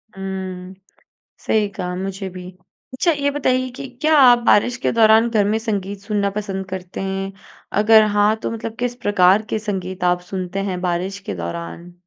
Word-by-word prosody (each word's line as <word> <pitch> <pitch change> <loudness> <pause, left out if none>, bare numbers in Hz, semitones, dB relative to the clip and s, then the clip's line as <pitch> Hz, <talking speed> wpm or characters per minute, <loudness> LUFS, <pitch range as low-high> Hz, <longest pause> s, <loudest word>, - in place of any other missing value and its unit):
हुँ, 190 -1 -6 0.7
सही 215 -1 +1
कहा, 180 -2 -5
मुझे 190 +1 -4
भी। 180 0 -9 0.4
अच्छा 335 +6 +2
ये 285 -2 0
बताइए 255 -2 0
कि 275 0 -7
क्या 310 +1 +4
आप 245 -3 +7
बारिश 240 +4 +4
के 245 - 0
दौरान 225 0 +5
घर 215 -3 +2
में 220 - +1
संगीत 200 -3 -3
सुनना 205 -1 -1
पसंद 195 -1 -4
करते 185 -1 -6
हैं? 195 0 -3 0.5
अगर 220 0 +7
हाँ 205 +1 +4
तो - - -2
मतलब 225 0 -5
किस 245 0 -1
प्रकार 205 -4 +3
के 215 - -1
संगीत 190 -3 -4
आप 180 0 +2
सुनते 185 0 -3
हैं 180 -1 -4
बारिश 180 +2 -2
के 195 - -6
दौरान? 85 - -6
195 Hz, 175 wpm, -20 LUFS, 185-220 Hz, 0.7 s, आप